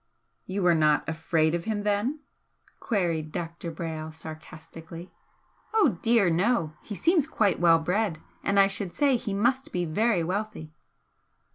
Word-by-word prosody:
"You 190 +1 -2
were 175 -1 +5
not 155 -2 +2
afraid 160 0 +1
of 170 -1 -2
him, 215 -2 -2
then?" 210 +9 0 0.6
queried 170 -8 -1
Dr. 170 +1 -5
Brayle, 160 -1 -5
sarcastically. 160 +2 -10 0.6
"Oh 400 - +3
dear 225 -4 +4
no! 170 -2 +1
He 210 - -7
seems 330 - +2
quite 215 - +1
well 165 -1 +6
bred, 180 +2 -1 0.3
and 200 0 +2
I 195 - +8
should 195 -2 -4
say 280 -3 +3
he 210 -4 -3
must 250 +6 +1
be 175 -1 -1
very 190 +3 +1
wealthy." 185 -3 -4
180 Hz, 145 wpm, -27 LUFS, 160-215 Hz, 0.6 s, I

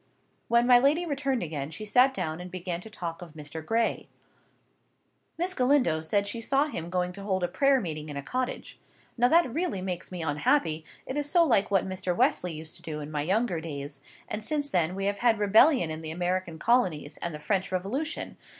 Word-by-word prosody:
When 235 +1 +4
my 245 -1 +7
lady 295 +7 +3
returned 275 - -1
again, 150 -4 -4
she 165 +7 -7
sat 250 +6 +5
down 175 -8 -3
and 180 - -7
began 180 -1 -4
to 220 - -10
talk 170 -6 -6
of 170 -3 -10
Mr. 155 +1 -8
Gray. 225 +6 0 1.3
"Miss 360 +2 0
Galindo 250 - +2
says 200 +6 0
she 230 +3 -3
saw 275 +5 +2
him 170 - -5
going 180 0 -1
to 200 - -9
hold 190 -2 -1
a - - +2
prayer 275 +8 +3
meeting 155 -7 -5
in 145 - -5
a 140 - -4
cottage. 255 - -4 0.4
Now 245 0 +4
that 325 -3 +3
really 330 - -1
makes 185 -1 -4
me 180 -2 -4
unhappy, 160 - +1 0.2
it 270 +3 -3
is 290 0 -1
so 345 0 +5
like 230 -10 +3
what 195 -2 +2
Mr. 185 -1 -2
Wesley 180 -2 +2
used 155 0 -7
to - - -17
do 155 -2 -5
in 150 0 -7
my 150 -1 -1
younger 185 +1 0
days; 140 -3 -6 0.3
and 210 0 -4
since 290 +3 -2
then 175 0 +1
we 195 0 -2
have 200 0 -1
had 235 -1 +3
rebellion 210 - +5
in 155 0 -5
the 160 - -6
American 175 0 -2
colonies 160 - +1
and 170 - -4
the 150 - -6
French 190 +5 -1
Revolution. 210 - -3
190 Hz, 210 wpm, -28 LUFS, 160-250 Hz, 1.3 s, my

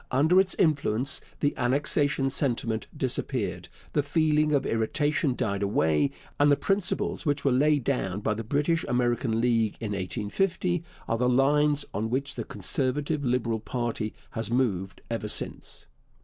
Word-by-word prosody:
Under 160 +8 +4
its 190 0 -1
influence 140 -6 +1 0.2
the 145 - +1
annexation 135 +1 +1
sentiment 115 -5 -1
disappeared, - - -2 0.2
the 145 - +3
feeling 150 +1 +2
of 140 -2 +2
irritation 145 +4 0
died 100 -4 -1
away, 80 -7 +2 0.3
and 145 0 +5
the - - +6
principles 195 +1 -1
which 145 -3 -1
were 135 - +4
laid 145 +2 +3
down 100 -8 -1
by 105 - 0
the 110 +2 -4
British 150 +8 +1
America 120 0 +1
League 115 -1 +1
in 110 -2 -4
1850 140 - -1 0.2
are 115 - 0
the 125 0 +2
lines 145 +3 +3
on 110 +3 -2
which 140 +3 -1
the 120 - -4
Conservative 140 - -1
Liberal 120 -3 0
party 115 -2 -3 0.2
has 115 -1 -3
moved 110 -7 -1
ever - - -2
since. - - -4
130 Hz, 150 wpm, -27 LUFS, 115-145 Hz, 0.3 s, the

